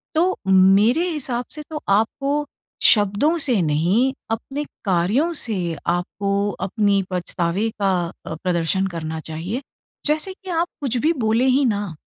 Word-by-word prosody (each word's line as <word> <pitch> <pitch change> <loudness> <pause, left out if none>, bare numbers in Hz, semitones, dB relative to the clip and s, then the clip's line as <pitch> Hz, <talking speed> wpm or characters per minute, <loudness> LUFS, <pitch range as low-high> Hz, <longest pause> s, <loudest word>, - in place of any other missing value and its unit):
तो, 360 +4 +2
मेरे 195 - +5
हिसाब 255 -6 -2
से 305 - -6
तो 305 -2 -5
आपको 275 +8 +1 0.4
शब्दों 210 - +4
से 240 -9 +2
नहीं 175 - +2 0.2
अपने 270 +6 -3 0.2
कार्यों 195 - +2
से 225 -3 -2 0.3
आपको 200 +3 0 0.2
अपनी 200 -1 +2
पछतावे 180 +3 -1
का 195 -1 +3 0.3
अ, 160 - -5
प्रदर्शन 180 +2 0
करना 160 -2 -5
चाहिए। 165 - -5 0.4
जैसे 310 +5 +2
कि 375 0 -13
आप 335 0 +1
कुछ 255 -3 -1
भी 310 +7 +2
बोले 225 +4 +3
हीं 265 +2 +3
ना। 205 -6 -1
210 Hz, 140 wpm, -21 LUFS, 185-280 Hz, 0.4 s, मेरे